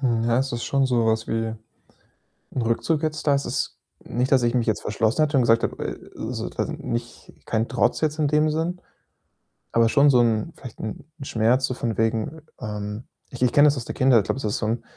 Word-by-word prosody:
Hm, 120 Hz, -4 st, +1 dB
ja, 120 Hz, +1 st, +2 dB
es 135 Hz, 0 st, -1 dB
ist 120 Hz, 0 st, -3 dB
schon 140 Hz, -1 st, +1 dB
so 120 Hz, -3 st, +2 dB
was 110 Hz, 0 st, +1 dB
wie 115 Hz, 0 st, -2 dB, 1.0 s
'n 125 Hz, -, 0 dB
Rückzug 145 Hz, +7 st, 0 dB
jetzt 155 Hz, -1 st, -2 dB
da. 145 Hz, -, +5 dB
Es 140 Hz, -, 0 dB
ist -, -, -3 dB, 0.3 s
nicht, 125 Hz, +3 st, -1 dB
dass 130 Hz, -2 st, +5 dB
ich 120 Hz, +1 st, +1 dB
mich 120 Hz, -2 st, +1 dB
jetzt 110 Hz, -, 0 dB
verschlossen 110 Hz, +7 st, +1 dB
hätte 150 Hz, -1 st, +1 dB
und 130 Hz, -, +5 dB
gesagt 115 Hz, 0 st, +4 dB
habe -, -, -2 dB
äh, -, -, -7 dB
so -, -, -4 dB
quasi -, -, -3 dB
nicht 120 Hz, 0 st, -5 dB
kein 115 Hz, 0 st, -1 dB
Trotz 125 Hz, -1 st, +1 dB
jetzt 155 Hz, 0 st, 0 dB
in 150 Hz, -2 st, +2 dB
dem 150 Hz, +1 st, +3 dB
Sinn, 165 Hz, +4 st, -2 dB, 0.9 s
aber 115 Hz, 0 st, +4 dB
schon 140 Hz, +5 st, +5 dB
so 125 Hz, -, +5 dB
'n 115 Hz, +4 st, +1 dB
vielleicht 125 Hz, -4 st, -11 dB
'n 110 Hz, +5 st, -6 dB
'n 135 Hz, -, -6 dB
Schmerz 120 Hz, +3 st, +2 dB
so 130 Hz, -, -3 dB
von 115 Hz, -4 st, -3 dB
wegen, 115 Hz, +7 st, -1 dB, 0.2 s
ähm 105 Hz, +1 st, -5 dB, 0.3 s
ich 125 Hz, -, -9 dB
ich 125 Hz, -, +3 dB
kenne 145 Hz, +1 st, +7 dB
das 145 Hz, -, +2 dB
aus 120 Hz, -, -4 dB
der -, -, -5 dB
Kindheit. 130 Hz, -3 st, +5 dB
Ich -, -, -9 dB
glaube, 130 Hz, -, -2 dB
es -, -, -7 dB
ist 105 Hz, -1 st, -1 dB
so 110 Hz, -, -2 dB
'n 115 Hz, +2 st, -1 dB
120 Hz, 235 wpm, -24 LUFS, 115-140 Hz, 1.0 s, kenne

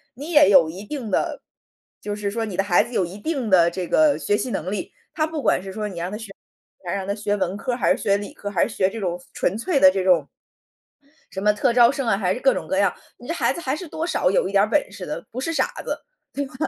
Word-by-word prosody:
你 290 Hz, +7 st, -7 dB
也 295 Hz, -, +6 dB
有 170 Hz, -5 st, +6 dB
一 185 Hz, +5 st, -8 dB
定 240 Hz, -3 st, -5 dB
的 -, -, -1 dB, 0.6 s
就 205 Hz, 0 st, -4 dB
是 205 Hz, -1 st, -3 dB
说 225 Hz, +1 st, -2 dB
你 205 Hz, -4 st, -6 dB
的 195 Hz, -, +2 dB
孩 190 Hz, -3 st, +4 dB
子 245 Hz, -, -11 dB
有 190 Hz, -, +1 dB
一 180 Hz, +3 st, -9 dB
定 260 Hz, 0 st, -2 dB
的 175 Hz, -3 st, +5 dB
这 180 Hz, +1 st, -4 dB
个 305 Hz, -, +4 dB
学 205 Hz, -, 0 dB
习 255 Hz, -, -3 dB
能 185 Hz, -3 st, -3 dB
力， 205 Hz, -, -4 dB, 0.2 s
他 310 Hz, -3 st, 0 dB
不 315 Hz, -2 st, -4 dB
管 -, -, +2 dB
是 190 Hz, 0 st, -8 dB
说 210 Hz, 0 st, -3 dB
你 180 Hz, -4 st, -7 dB
让 175 Hz, +2 st, -3 dB
他 210 Hz, -, -4 dB
学 220 Hz, -2 st, -9 dB, 0.5 s
你 -, -, -24 dB
想 170 Hz, -, -1 dB
让 195 Hz, -1 st, -3 dB
他 200 Hz, -, 0 dB
学 205 Hz, -1 st, -1 dB
文 190 Hz, -1 st, -2 dB
科 250 Hz, +4 st, -3 dB
儿 -, -, -2 dB
还 -, -, +3 dB
是 -, -, -9 dB
学 200 Hz, -3 st, +2 dB
理 205 Hz, 0 st, -7 dB
科 -, -, -9 dB
儿， -, -, -8 dB
还 185 Hz, -, +2 dB
是 230 Hz, -, -9 dB
学 190 Hz, -1 st, +2 dB
这 225 Hz, -, -8 dB
种 180 Hz, -3 st, -3 dB
纯 190 Hz, -, -1 dB
粹 285 Hz, +7 st, 0 dB
的 185 Hz, -, +8 dB
这 190 Hz, 0 st, -1 dB
种 170 Hz, -6 st, +4 dB, 1.0 s
什 190 Hz, -, -5 dB
么 210 Hz, +1 st, +4 dB
特 235 Hz, +4 st, +1 dB
招 235 Hz, 0 st, +6 dB
生 275 Hz, -2 st, -3 dB
啊， 225 Hz, -, +3 dB
还 190 Hz, -2 st, 0 dB
是 -, -, -6 dB
各 270 Hz, 0 st, +4 dB
种 -, -, -4 dB
各 -, -, 0 dB
样， 200 Hz, -2 st, +3 dB, 0.3 s
你 245 Hz, -, -12 dB
这 335 Hz, -, -1 dB
孩 -, -, +1 dB
子 -, -, -7 dB
还 265 Hz, -5 st, -1 dB
是 350 Hz, +1 st, -8 dB
多 320 Hz, +2 st, -3 dB
少 180 Hz, -, +1 dB
有 190 Hz, -, +2 dB
一 -, -, -7 dB
点 200 Hz, 0 st, +5 dB
儿 -, -, -3 dB
本 290 Hz, +6 st, +1 dB
事 -, -, -8 dB
的， -, -, -5 dB
不 250 Hz, -, -5 dB
是 330 Hz, +5 st, -2 dB
傻 -, -, +2 dB, 0.2 s
子， -, -, -4 dB, 0.3 s
对 285 Hz, -, -2 dB
吧？ 265 Hz, -, -15 dB
205 Hz, 320 characters per minute, -23 LUFS, 190-255 Hz, 1.0 s, 的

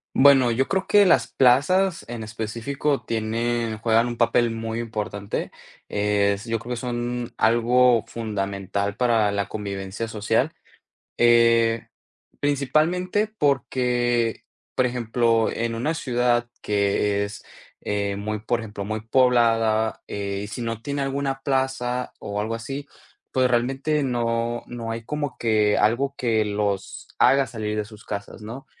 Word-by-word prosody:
Bueno, 135 Hz, -3 st, +6 dB
yo 130 Hz, +3 st, +1 dB
creo 190 Hz, -1 st, 0 dB
que 205 Hz, -1 st, +5 dB
las 130 Hz, -9 st, +4 dB
plazas 165 Hz, +9 st, +3 dB
en 120 Hz, -1 st, -6 dB
específico 115 Hz, +6 st, -2 dB
tienen 115 Hz, 0 st, -1 dB
juegan 115 Hz, +2 st, +2 dB
un 120 Hz, -, -5 dB
papel 115 Hz, 0 st, +3 dB
muy 115 Hz, 0 st, -4 dB
importante. 105 Hz, -3 st, -4 dB, 0.4 s
Es 100 Hz, 0 st, +1 dB
Yo 115 Hz, -1 st, -1 dB
creo 120 Hz, +3 st, -7 dB
que -, -, -6 dB
son 120 Hz, 0 st, -3 dB
algo 120 Hz, +1 st, +4 dB
fundamental 100 Hz, -2 st, -3 dB
para 115 Hz, -4 st, +2 dB
la 100 Hz, -1 st, -1 dB
convivencia 100 Hz, +1 st, -5 dB
social. 110 Hz, +7 st, 0 dB, 0.6 s
Eh, 115 Hz, -1 st, +4 dB, 0.5 s
principalmente 160 Hz, +8 st, +1 dB
porque, 120 Hz, -, +1 dB, 0.3 s
por 130 Hz, -, +2 dB
ejemplo, 115 Hz, -2 st, +1 dB
en 115 Hz, 0 st, -2 dB
una 145 Hz, +8 st, -1 dB
ciudad 120 Hz, -5 st, +1 dB
que 100 Hz, 0 st, +1 dB
es, 100 Hz, -, -9 dB, 0.4 s
eh, 100 Hz, -1 st, -1 dB
muy, 105 Hz, +1 st, -3 dB
por 120 Hz, +2 st, -1 dB
ejemplo, 105 Hz, -3 st, -6 dB
muy 110 Hz, +1 st, -3 dB
poblada, 115 Hz, -2 st, +2 dB
eh, 100 Hz, -1 st, -3 dB
y -, -, -8 dB
si 110 Hz, +4 st, -6 dB
no 115 Hz, -1 st, -3 dB
tiene 140 Hz, +2 st, -3 dB
alguna 135 Hz, 0 st, -2 dB
plaza 130 Hz, -2 st, -1 dB
o 100 Hz, 0 st, -4 dB
algo 110 Hz, +2 st, -2 dB
así, 135 Hz, +5 st, -6 dB, 0.5 s
pues, 130 Hz, -1 st, +3 dB
realmente 135 Hz, +5 st, +1 dB
no 120 Hz, -2 st, -1 dB
no 115 Hz, -2 st, -5 dB
hay 115 Hz, 0 st, -5 dB
como 145 Hz, +2 st, -3 dB
que 110 Hz, -2 st, +2 dB
algo 135 Hz, +6 st, +1 dB
que 110 Hz, -3 st, +1 dB
los 100 Hz, -1 st, -3 dB
haga 135 Hz, 0 st, +5 dB
salir 110 Hz, -3 st, -4 dB
de 105 Hz, -, -1 dB
sus 105 Hz, 0 st, -14 dB
casas, 100 Hz, +1 st, -6 dB
¿no?, 115 Hz, +6 st, -8 dB
115 Hz, 140 wpm, -24 LUFS, 110-125 Hz, 0.6 s, Bueno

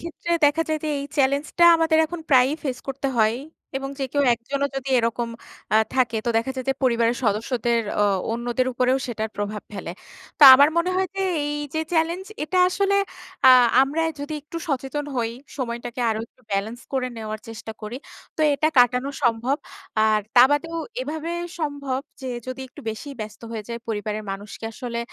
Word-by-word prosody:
ক্ষেত্রে 335 Hz, +1 st, -7 dB
দেখা 295 Hz, +3 st, +4 dB
যায় 310 Hz, 0 st, 0 dB
যে -, -, -1 dB
এই -, -, -4 dB
চ্যালেঞ্জটা 280 Hz, +5 st, +2 dB
আমাদের 320 Hz, -1 st, +3 dB
এখন 345 Hz, +1 st, -6 dB
প্রায়ই 260 Hz, +2 st, +5 dB
ফেস 260 Hz, -3 st, -3 dB
করতে 275 Hz, 0 st, -2 dB
হয়। 220 Hz, +1 st, +3 dB, 0.4 s
এবং 270 Hz, 0 st, -5 dB
যে 270 Hz, -, -1 dB
কেউ 285 Hz, -1 st, +2 dB
একজনও 275 Hz, +5 st, -2 dB
যদি 270 Hz, 0 st, -4 dB
এরকম 235 Hz, 0 st, -1 dB, 0.5 s
আ -, -, +7 dB, 0.2 s
থাকে 245 Hz, -3 st, +2 dB
তো -, -, +2 dB
দেখা 230 Hz, +4 st, 0 dB
যায় 260 Hz, -, -4 dB
যে, 270 Hz, -, +2 dB
পরিবারের 235 Hz, -2 st, +2 dB
সদস্যদের 235 Hz, +2 st, +1 dB, 0.2 s
অ -, -, +5 dB, 0.3 s
অন্যদের 240 Hz, +2 st, -1 dB
উপরেও 255 Hz, +2 st, +2 dB
সেটার 220 Hz, -3 st, -3 dB
প্রভাব 205 Hz, 0 st, -3 dB
ফেলে। 195 Hz, -4 st, -6 dB, 0.5 s
তো -, -, +2 dB
আমার 285 Hz, +2 st, +7 dB
মনে 340 Hz, +2 st, +2 dB
হয় 380 Hz, 0 st, +1 dB
যে 390 Hz, -, 0 dB, 0.2 s
এই 295 Hz, 0 st, -2 dB, 0.2 s
যে 315 Hz, -, +1 dB
চ্যালেঞ্জ, 335 Hz, +3 st, +1 dB, 0.2 s
এটা 365 Hz, +4 st, 0 dB
আসলে 395 Hz, +2 st, +1 dB, 0.5 s
আ -, -, +10 dB, 0.3 s
আমরাই 320 Hz, +4 st, 0 dB
যদি 290 Hz, +2 st, -4 dB
একটু 300 Hz, +3 st, -9 dB
সচেতন 275 Hz, +1 st, -2 dB
হই, 230 Hz, -2 st, 0 dB, 0.3 s
সময়টাকে 240 Hz, -1 st, -4 dB
আরো 220 Hz, -, -1 dB
একটু 255 Hz, -, -32 dB
ব্যালেন্স 215 Hz, +5 st, -2 dB
করে 260 Hz, -2 st, 0 dB
নেওয়ার 215 Hz, -1 st, -5 dB
চেষ্টা 225 Hz, 0 st, -7 dB
করি, 215 Hz, +3 st, -5 dB, 0.4 s
তো -, -, -4 dB
এটা 310 Hz, +2 st, +2 dB
কাটানো 250 Hz, +2 st, +4 dB
সম্ভব। 240 Hz, +2 st, +1 dB, 0.5 s
আর 215 Hz, -1 st, +3 dB, 0.2 s
তা 245 Hz, -, +10 dB
বাদেও 330 Hz, +3 st, 0 dB, 0.2 s
এভাবে 320 Hz, -6 st, -4 dB, 0.3 s
সম্ভব 285 Hz, -4 st, -2 dB, 0.2 s
যে 260 Hz, -, -5 dB, 0.2 s
যদি 255 Hz, +1 st, -5 dB
একটু 255 Hz, -, -13 dB
বেশিই 275 Hz, +6 st, -7 dB
ব্যস্ত 215 Hz, -1 st, -7 dB
হয়ে 225 Hz, -2 st, -4 dB
যাই 235 Hz, 0 st, -4 dB
পরিবারের 215 Hz, 0 st, -3 dB
মানুষকে 200 Hz, +3 st, -7 dB
আসলে 235 Hz, 0 st, -5 dB
255 Hz, 180 wpm, -23 LUFS, 230-290 Hz, 0.5 s, আ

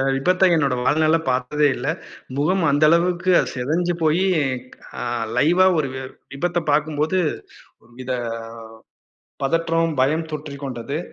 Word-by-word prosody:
விபத்த 180 Hz, +7 st, +3 dB
என்னோட 140 Hz, -5 st, +1 dB
வாழ்நாள 155 Hz, +2 st, +3 dB
பாத்ததே 130 Hz, +4 st, +1 dB
இல்ல. 125 Hz, +4 st, -5 dB, 0.5 s
முகம் 180 Hz, +5 st, +1 dB
அந்தளவுக்கு 170 Hz, +5 st, +3 dB, 0.2 s
செதஞ்சுபோயி 165 Hz, +5 st, 0 dB, 0.8 s
அ -, -, -3 dB, 0.3 s
லைவா 175 Hz, +7 st, +4 dB
ஒரு 145 Hz, -4 st, 0 dB
வி 130 Hz, -, -5 dB, 0.3 s
விபத்த 175 Hz, +3 st, -1 dB
பாக்கும்போது, 155 Hz, +4 st, +1 dB, 0.6 s
ஒரு 120 Hz, -, -24 dB
வித 130 Hz, 0 st, -5 dB, 1.3 s
பதற்றம், 165 Hz, +2 st, 0 dB
பயம் 160 Hz, +4 st, 0 dB
தொற்றிக் 145 Hz, -2 st, -7 dB
கொண்டது. 130 Hz, +3 st, -4 dB
155 Hz, 110 wpm, -21 LUFS, 140-170 Hz, 1.3 s, லைவா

